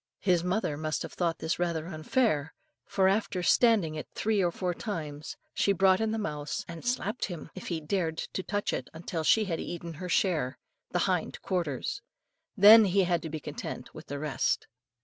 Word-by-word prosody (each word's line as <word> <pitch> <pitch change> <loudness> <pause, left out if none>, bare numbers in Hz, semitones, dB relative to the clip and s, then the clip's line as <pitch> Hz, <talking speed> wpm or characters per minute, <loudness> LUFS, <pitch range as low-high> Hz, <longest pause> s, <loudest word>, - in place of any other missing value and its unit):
His 180 -3 +3
mother 180 -5 0
must 155 0 -2
have - - -7
thought 170 -2 0
this 160 +1 -2
rather 170 -2 -1
unfair, 160 - 0 0.3
for 190 -1 +2
after 195 -2 +1
standing 210 -7 +4
it 155 - -5
three 215 -2 +1
or 175 - +2
four 180 0 -2
times, 155 -8 -5 0.2
she 200 - +2
brought 190 +2 +4
in 220 - +1
the 220 - -1
mouse, 150 -7 -3
and 170 -1 -8
slapped 245 0 -1
him 175 -5 -7
if 185 - -8
he 170 -3 -1
dared 160 0 -1
to 190 - -4
touch 205 +2 -2
it - - -3
until 165 0 -4
she 215 +7 +4
had 170 -4 -2
eaten 170 -1 -5
her 180 - -4
share 155 -9 +1 0.3
the - - +1
hind - - -1
quarters; 185 - -2 0.6
then 215 +3 +10
he 195 0 +3
had 175 -2 +1
to 160 - -5
be 155 0 -4
content - - -7
with - - -11
the 145 - -4
rest. 150 -1 0
175 Hz, 190 wpm, -29 LUFS, 160-200 Hz, 0.6 s, then